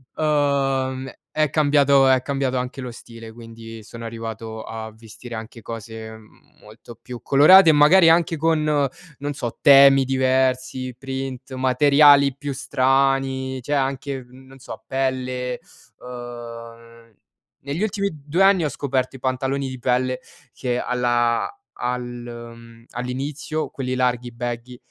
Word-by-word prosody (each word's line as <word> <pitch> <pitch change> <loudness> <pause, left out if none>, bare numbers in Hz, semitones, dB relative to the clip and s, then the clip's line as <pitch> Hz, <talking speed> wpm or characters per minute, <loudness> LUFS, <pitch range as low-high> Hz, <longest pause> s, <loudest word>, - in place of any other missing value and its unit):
uhm, 135 -3 0 0.2
è 155 -2 +1
cambiato 140 -2 +4
è 130 -1 +4
cambiato 135 -2 -2
anche 125 +2 -4
lo 125 - -6
stile, 115 -1 -12
quindi 115 -1 -11
sono 115 +2 -10
arrivato 115 -1 -7
a 110 0 -7
vestire 115 +2 -12
anche 110 +1 -9
cose, 110 0 -8
mhmm, 110 -1 -18
molto 110 +2 -14
più 125 -1 -9
colorate 165 +6 +7
e - - +6
magari 165 +4 +6
anche 165 0 +3
con, 160 0 +1
non 145 0 -2
so, 120 -4 -5
temi 135 -1 +7
diversi, 130 -1 0
print, 135 -1 -6
materiali 140 +1 +5
più 145 0 -5
strani, 135 -1 0
c'è 135 - -8
anche 135 -1 -2
n 130 +1 -16
non 135 +1 -16
so 130 - -10
pelle. 130 -1 -2 0.4
Ehm, 115 -2 -10 0.5
negli 145 +7 -4
ultimi 200 -2 -1
2 150 +5 -1
anni 195 -4 +4
ho - - 0
scoperto 135 -1 -2
i - - -10
pantaloni 135 +1 -2
di 130 -1 -8
pelle 130 +1 0 0.3
che 125 -2 -2
alla 120 -1 0 0.3
al 125 0 -3
mhmm, 120 -1 -10
all'inizio 140 +5 -4
quelli 130 -1 -4
larghi, 125 -1 -1
baggy, 120 +1 -6
130 Hz, 135 wpm, -22 LUFS, 120-140 Hz, 0.5 s, colorate